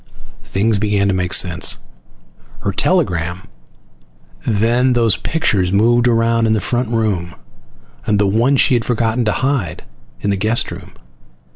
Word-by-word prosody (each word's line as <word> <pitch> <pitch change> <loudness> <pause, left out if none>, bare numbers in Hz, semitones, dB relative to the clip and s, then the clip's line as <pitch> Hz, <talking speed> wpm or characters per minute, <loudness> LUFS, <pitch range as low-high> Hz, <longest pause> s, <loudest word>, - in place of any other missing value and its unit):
Things 105 +1 0
began 100 -1 0
to - - +1
make 90 -1 -2
sense. 85 -4 +3 0.8
Her 100 - -1
telegram, 90 - -1 1.0
then 120 +4 +2
those 115 -3 +2
pictures 100 - -1
moved 120 +4 +3
around 115 -1 +2
in 110 - +2
the 110 - +1
front 120 +2 -2
room, 105 -7 -2 0.7
and 105 - +2
the 100 - +2
one 115 +8 +2
she 130 - +3
had 120 -2 +1
forgotten 115 0 -1
to 105 - +1
hide, 115 - -2 0.4
in 100 - -1
the 100 - -1
guest 110 +4 +1
room. - - -10
110 Hz, 145 wpm, -17 LUFS, 100-120 Hz, 1.0 s, sense